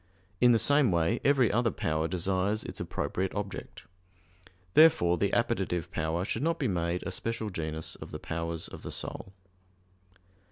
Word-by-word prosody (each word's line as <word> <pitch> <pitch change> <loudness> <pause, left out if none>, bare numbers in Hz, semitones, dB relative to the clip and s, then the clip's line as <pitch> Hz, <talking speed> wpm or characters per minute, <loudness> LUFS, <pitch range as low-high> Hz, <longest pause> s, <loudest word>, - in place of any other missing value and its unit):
In 125 0 +6
the 115 - +5
same 140 +1 +4
way 85 +7 +1
every 135 -5 +4
other 115 +2 +2
power 80 -5 -1
desires 95 +4 0
its - - -7
appropriate 90 +7 -2
object. 100 -1 -6 0.9
Therefore 150 - +6
the 100 +2 0
appetitive 95 -8 0
power 80 +3 -1
should 110 - -2
not 165 +2 +1
be 140 - 0
made 85 -2 -1
a 95 - -4
special 110 +2 -3
genus 80 -2 -3
of - - -9
the - - -6
powers 85 0 -3
of - - -10
the - - -7
soul. 95 - -5
95 Hz, 160 wpm, -29 LUFS, 85-115 Hz, 0.9 s, In